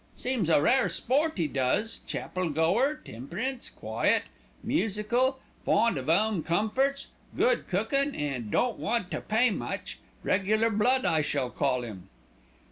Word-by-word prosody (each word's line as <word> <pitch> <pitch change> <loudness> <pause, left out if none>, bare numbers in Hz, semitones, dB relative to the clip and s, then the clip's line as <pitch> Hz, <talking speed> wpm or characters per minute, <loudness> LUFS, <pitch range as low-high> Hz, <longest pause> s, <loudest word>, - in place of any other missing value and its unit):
Seems 245 -9 -1
a 160 - +5
rare 245 - +3
sport 295 +4 0
'e 165 - +2
does, 140 - 0
chapel 185 -2 -3
goer, 190 - +1
temperance, 205 - -4
quiet, - - 0 0.4
musical, 235 +6 +1 0.3
fond 230 +2 +3
of 135 +1 -4
'ome 205 +2 +2
comforts, 220 - 0 0.3
good - - +2
cookin'; 275 +9 0
an' 135 -7 -3
don't 240 - 0
want 225 -4 -1
to - - -3
pay 225 +3 +2
much; - - -5 0.2
regular 215 +4 +2
blood 250 +5 +2
I 160 -1 +3
should 140 -3 -1
call 125 0 0
'im." 95 -5 -9
210 Hz, 135 wpm, -28 LUFS, 160-250 Hz, 0.4 s, a